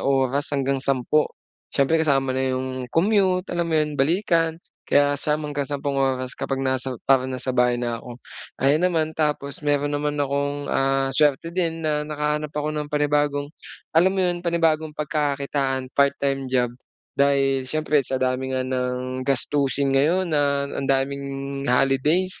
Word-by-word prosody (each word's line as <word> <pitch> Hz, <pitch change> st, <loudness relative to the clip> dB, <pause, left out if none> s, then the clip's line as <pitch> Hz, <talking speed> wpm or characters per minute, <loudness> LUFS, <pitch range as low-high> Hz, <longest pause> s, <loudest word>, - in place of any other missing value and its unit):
oras 135 Hz, +1 st, +1 dB
hanggang 140 Hz, -1 st, 0 dB
10. 135 Hz, +3 st, +1 dB, 0.4 s
Siyempre, 155 Hz, +4 st, +2 dB
kasama 135 Hz, -4 st, +2 dB
na 130 Hz, -, -1 dB, 0.2 s
'yong 130 Hz, -1 st, -4 dB
commute 185 Hz, -, +2 dB
alam 170 Hz, -1 st, -1 dB
mo 160 Hz, -, 0 dB
'yon, 150 Hz, -1 st, 0 dB
balikan 165 Hz, +1 st, +1 dB, 0.3 s
kaya 145 Hz, 0 st, +4 dB
9 150 Hz, +1 st, -1 dB
hanggang 145 Hz, -1 st, -2 dB
sampung 140 Hz, -1 st, -2 dB
oras 130 Hz, -1 st, 0 dB
kapag 135 Hz, -1 st, -2 dB
nasa 130 Hz, 0 st, -1 dB, 0.2 s
parang 130 Hz, -1 st, +4 dB
nasa 130 Hz, 0 st, -3 dB
bahay 125 Hz, 0 st, +3 dB
na 120 Hz, -1 st, -2 dB
ako. 120 Hz, -1 st, -8 dB, 0.5 s
Ayan, 150 Hz, +5 st, +3 dB
naman 160 Hz, -3 st, 0 dB
tapos 150 Hz, -3 st, -1 dB
meron 145 Hz, 0 st, +1 dB
naman 145 Hz, 0 st, -1 dB
akong, 140 Hz, +1 st, -1 dB
ah, 135 Hz, 0 st, +1 dB
suwerte 150 Hz, +2 st, +2 dB
din 170 Hz, -2 st, -1 dB
na 150 Hz, -1 st, 0 dB
nakahanap 150 Hz, 0 st, -2 dB
ako 150 Hz, 0 st, -1 dB
ng 150 Hz, -1 st, -4 dB
panibagong 145 Hz, -1 st, +1 dB, 0.5 s
alam 180 Hz, +3 st, +5 dB
mo 190 Hz, -, 0 dB
'yon, 175 Hz, -1 st, -1 dB
panibagong 160 Hz, -2 st, +1 dB
pagkakakitaan, 140 Hz, -3 st, -1 dB
part-time 140 Hz, -1 st, +1 dB
job. 125 Hz, -1 st, +2 dB, 0.5 s
Dahil 135 Hz, -1 st, +2 dB
siyempre, 155 Hz, +1 st, +1 dB
sa 130 Hz, -, -2 dB
dami 130 Hz, +1 st, -1 dB
nga 130 Hz, -, 0 dB
ng 130 Hz, 0 st, -2 dB
gastusin 140 Hz, +1 st, +1 dB
ngayon 165 Hz, +7 st, +2 dB
na 140 Hz, -1 st, +1 dB
ang -, -, -4 dB
daming 140 Hz, 0 st, -2 dB
holidays 135 Hz, +8 st, +2 dB
140 Hz, 155 wpm, -23 LUFS, 135-150 Hz, 0.5 s, alam